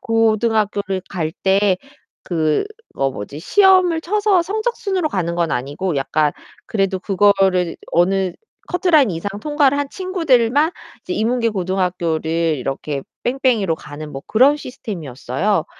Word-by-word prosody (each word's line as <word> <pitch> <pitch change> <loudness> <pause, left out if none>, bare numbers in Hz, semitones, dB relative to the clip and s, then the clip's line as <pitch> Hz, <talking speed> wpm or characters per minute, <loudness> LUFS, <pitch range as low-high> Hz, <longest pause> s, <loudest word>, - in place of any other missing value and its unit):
고등학교를 215 -3 +1
갈 160 -4 -3
때 195 0 +3 0.5
그 155 - 0 0.3
어 135 0 +2
뭐지 130 +4 -7
시험을 370 - +4
쳐서 405 +1 +2
성적순으로 405 -3 -1
가는 170 - -2
건 170 -1 0
아니고 145 +7 -2
약간 145 +2 +1 0.3
그래도 195 -3 0
그거를 195 -1 +3
이제 - - -7 0.2
어느 185 +1 +2 0.4
커트라인 330 - +3
이상 165 +4 -3
통과를 290 -1 +2
한 285 -1 -1
친구들만 310 -6 +2 0.3
이제 365 - -5
인문계 230 -5 +1
고등학교를 180 -4 -1 0.3
이렇게 135 +2 -4 0.2
뺑뺑이로 240 - +1
가는 150 0 -9
뭐 135 -1 -7
그런 265 +6 +4
시스템이었어요. 180 - -3
200 Hz, 310 characters per minute, -19 LUFS, -, 0.5 s, 시험을